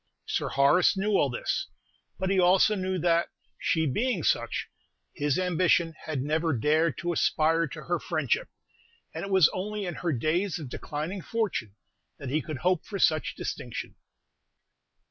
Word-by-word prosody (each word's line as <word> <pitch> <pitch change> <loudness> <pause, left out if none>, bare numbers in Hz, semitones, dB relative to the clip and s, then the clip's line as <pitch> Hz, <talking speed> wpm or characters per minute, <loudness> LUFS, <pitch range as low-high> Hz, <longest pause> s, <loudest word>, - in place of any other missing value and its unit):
Sir - - -1
Horace 145 +8 +4
knew 205 +2 0
all 150 -8 +3
this; 120 - -2 0.5
but 190 0 -1
he 195 - +3
also 185 +4 +5
knew 185 -2 -1
that, 170 0 +2 0.3
she 160 -1 +1
being 240 - 0
such, - - 0 0.5
his 145 -3 0
ambition 175 -2 +2
had 145 -5 -2
never 160 +2 0
dared 155 +6 +2
to 175 0 -2
aspire 165 +1 +2
to 150 +1 -9
her 175 -1 -1
friendship, 145 -6 -1 0.6
and - - -5
it 195 - -5
was 190 -5 +6
only 205 +2 -3
in 175 - -3
her 170 +1 -2
days 165 - 0
of 150 -6 -7
declining 155 +9 -5
fortune 185 - -2 0.4
that 140 - -6
he 155 +2 +1
could 155 -2 -5
hope 180 +3 +1
for 205 - -6
such 155 -5 +2
distinction. - - -5
170 Hz, 160 wpm, -28 LUFS, 155-185 Hz, 0.6 s, was